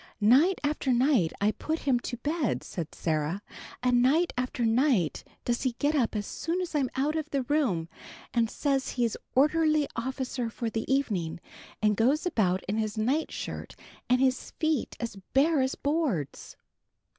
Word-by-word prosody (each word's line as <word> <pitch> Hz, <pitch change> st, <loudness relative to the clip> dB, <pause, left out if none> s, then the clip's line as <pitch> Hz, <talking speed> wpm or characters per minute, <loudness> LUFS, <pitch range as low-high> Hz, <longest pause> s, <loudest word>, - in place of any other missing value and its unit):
"Night 270 Hz, -, +5 dB
after 290 Hz, -2 st, 0 dB
night 245 Hz, -, +3 dB
do -, -, -14 dB
I 210 Hz, -, +4 dB
put 315 Hz, +8 st, -3 dB
him 260 Hz, -3 st, +2 dB
to 245 Hz, 0 st, -5 dB
bed," 285 Hz, -, -1 dB
said 165 Hz, -4 st, -6 dB
Sarah, 160 Hz, +4 st, -1 dB, 0.4 s
"and 250 Hz, -1 st, +4 dB
night 310 Hz, +8 st, +3 dB
after 250 Hz, -1 st, -1 dB
night 225 Hz, -, +2 dB, 0.2 s
does 240 Hz, 0 st, 0 dB
he 255 Hz, -2 st, 0 dB
get 290 Hz, +5 st, 0 dB
up 250 Hz, -7 st, +1 dB
as 205 Hz, -1 st, -1 dB
soon 335 Hz, -, -2 dB
as 360 Hz, -2 st, -3 dB
I'm 275 Hz, -4 st, +1 dB
out 285 Hz, +4 st, 0 dB
of 310 Hz, -1 st, -2 dB
the 275 Hz, -3 st, 0 dB
room, 245 Hz, -, +1 dB, 0.5 s
and 230 Hz, -2 st, +2 dB
says 275 Hz, 0 st, -1 dB
he's 235 Hz, -3 st, 0 dB, 0.2 s
orderly 305 Hz, +1 st, +3 dB
officer 255 Hz, 0 st, -3 dB
for 230 Hz, 0 st, -4 dB
the 225 Hz, +4 st, -3 dB
evening, 200 Hz, -13 st, 0 dB, 0.4 s
and 210 Hz, -1 st, +4 dB
goes 265 Hz, -, +2 dB
about 190 Hz, -, +1 dB
in 210 Hz, +3 st, -2 dB
his 215 Hz, 0 st, -2 dB
night 260 Hz, +9 st, 0 dB
shirt -, -, -6 dB, 0.3 s
and 250 Hz, 0 st, +4 dB
his 260 Hz, -1 st, +1 dB
feet 315 Hz, -5 st, 0 dB
as 230 Hz, -4 st, -4 dB, 0.2 s
bare 295 Hz, +1 st, +4 dB
as 260 Hz, +1 st, 0 dB
boards." 280 Hz, -, -2 dB
255 Hz, 170 wpm, -28 LUFS, 220-295 Hz, 0.5 s, Night